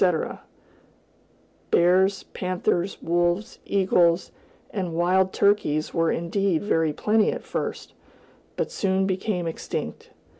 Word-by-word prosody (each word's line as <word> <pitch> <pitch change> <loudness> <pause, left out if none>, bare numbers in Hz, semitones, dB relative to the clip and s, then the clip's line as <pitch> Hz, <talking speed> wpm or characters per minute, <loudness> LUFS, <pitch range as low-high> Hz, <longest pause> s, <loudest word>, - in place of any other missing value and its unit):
"[B] 190 - +6 1.6
Bears, 185 +3 +3
panthers, 185 0 -1
wolves, 175 +4 0
eagles, 180 -3 +2 0.4
and 180 -5 -3
wild 185 +2 +2
turkeys 160 -7 +1
were 165 -1 +2
indeed 175 +1 0
very 165 -6 +1
plenty 215 +7 +2
at - - -6
first, - - -4 0.6
but - - -2
soon 190 -1 +1
became 185 -1 -1
extinct. 165 - -5
185 Hz, 105 wpm, -25 LUFS, 170-195 Hz, 1.6 s, B